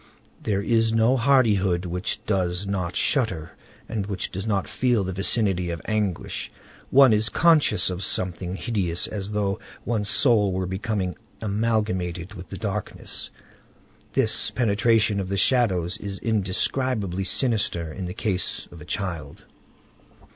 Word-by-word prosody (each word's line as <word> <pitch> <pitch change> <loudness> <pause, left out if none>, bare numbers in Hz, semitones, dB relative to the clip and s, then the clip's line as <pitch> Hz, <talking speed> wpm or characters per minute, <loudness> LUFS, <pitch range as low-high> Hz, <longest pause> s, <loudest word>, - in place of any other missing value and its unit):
There 100 -2 -1
is 115 0 +2
no 115 +3 +3
hardihood 105 -9 +3
which 90 +2 -3
does 90 -2 0
not 90 -3 -2
shudder 95 - +1 0.4
and 105 -3 -3
which 95 -3 -3
does 95 +4 -5
not 100 -3 0
feel 120 -5 +1
the 95 0 -3
vicinity 95 -2 +1
of 85 -1 -3
anguish. 105 -5 -2 0.4
One 135 -3 +7
is 110 +2 +2
conscious 150 - +4
of 90 +1 -4
something 90 0 -1
hideous, 95 -6 -1
as 100 -1 -5
though 105 -1 -1 0.3
one's 105 -3 0
soul 105 -4 +4
were 95 0 -1
becoming 95 -1 -2 0.2
amalgamated 100 -4 -1
with 90 -4 -10
the - - -6
darkness. - - -4 0.8
This 110 -4 +3
penetration 110 -1 +2
of 95 -1 -3
the 100 - -1
shadows 95 -6 +2
is 100 -2 -6
indescribably 105 -1 -1
sinister 95 - 0
in 95 +1 -5
the 90 - -6
case 95 -4 -2
of 85 - -12
a - - -10
child. 90 -7 -4
100 Hz, 140 wpm, -24 LUFS, 90-110 Hz, 0.8 s, One